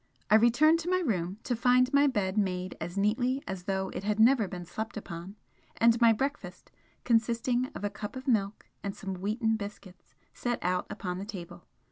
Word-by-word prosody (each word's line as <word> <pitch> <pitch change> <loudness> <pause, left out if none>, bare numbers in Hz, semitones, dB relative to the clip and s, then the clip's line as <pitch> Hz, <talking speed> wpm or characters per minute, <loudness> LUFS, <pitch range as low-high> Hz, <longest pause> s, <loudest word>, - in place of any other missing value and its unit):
I - - +8
returned 245 +9 +5
to 335 +1 -4
my 370 - +3
room 195 - -1
to 245 - -1
find 250 +2 +3
my 285 +1 +5
bed 205 -7 0
made 185 -3 -1
as 175 +4 -5
neatly 245 +7 +1
as 190 -2 -5
though 190 -1 -1
it 185 - -6
had 210 +1 -1
never 230 -2 +5
been 180 -1 -7
slept 220 +6 -5
upon, 175 -1 -7 0.4
and 230 +1 +4
my 230 -1 +7
breakfast, 270 +6 -3 0.3
consisting 235 +2 +1
of - - -7
a 205 - -1
cup 210 +2 -7
of 260 +1 -8
milk 210 -4 0 0.2
and 200 -1 -4
some 195 -2 -5
wheaten 220 +4 0
biscuits, 200 -3 -10 0.2
set 240 -1 -2
out 180 +1 0
upon 180 -2 -4
the 195 - -5
table. 175 -4 -9
210 Hz, 190 wpm, -29 LUFS, 190-245 Hz, 0.4 s, I